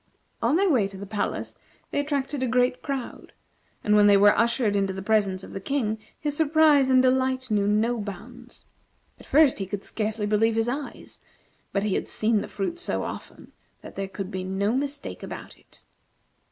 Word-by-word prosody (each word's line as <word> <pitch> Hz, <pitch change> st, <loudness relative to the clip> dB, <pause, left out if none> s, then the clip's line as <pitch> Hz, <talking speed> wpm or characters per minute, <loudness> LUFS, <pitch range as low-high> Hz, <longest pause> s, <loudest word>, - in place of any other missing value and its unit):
On 235 Hz, +6 st, +2 dB
their 390 Hz, +3 st, +3 dB
way 250 Hz, -, +3 dB
to 195 Hz, -1 st, -11 dB
the 200 Hz, -, -7 dB
palace 205 Hz, +1 st, -3 dB, 0.4 s
they -, -, 0 dB
attracted 285 Hz, -1 st, -2 dB
a 260 Hz, -, +1 dB
great 250 Hz, +1 st, +1 dB
crowd, 275 Hz, -4 st, -5 dB, 0.5 s
and 210 Hz, -, +3 dB
when 205 Hz, 0 st, +6 dB
they 200 Hz, -1 st, +7 dB
were 205 Hz, +1 st, +6 dB
ushered 230 Hz, -2 st, +2 dB
into 195 Hz, -1 st, 0 dB
the 190 Hz, -, -6 dB
presence 200 Hz, -3 st, +1 dB
of -, -, -10 dB
the -, -, -4 dB
King, 220 Hz, -1 st, -1 dB, 0.2 s
his 295 Hz, -1 st, -1 dB
surprise 305 Hz, -3 st, +4 dB
and 260 Hz, 0 st, +5 dB
delight 260 Hz, -1 st, +1 dB
knew 205 Hz, -1 st, +2 dB
no 225 Hz, +3 st, +1 dB
bounds. 235 Hz, +5 st, -9 dB, 0.5 s
At -, -, -15 dB
first 290 Hz, -5 st, +4 dB
he 195 Hz, -, -3 dB
could 200 Hz, 0 st, -5 dB
scarcely 215 Hz, -1 st, -2 dB
believe 215 Hz, +2 st, +2 dB
his 225 Hz, +1 st, +1 dB
eyes; 275 Hz, +3 st, -6 dB, 0.5 s
but 200 Hz, -, 0 dB
he 210 Hz, -2 st, 0 dB
had -, -, -1 dB
seen 215 Hz, -1 st, +1 dB
the -, -, -6 dB
fruit 270 Hz, -, -4 dB
so -, -, -2 dB
often -, -, -8 dB, 0.3 s
that -, -, -11 dB
there 195 Hz, 0 st, -3 dB
could 195 Hz, 0 st, -6 dB
be 185 Hz, -2 st, -4 dB
no 190 Hz, +3 st, -1 dB
mistake 285 Hz, +1 st, -4 dB
about -, -, -8 dB
it. -, -, -20 dB
225 Hz, 195 wpm, -25 LUFS, 205-265 Hz, 0.5 s, they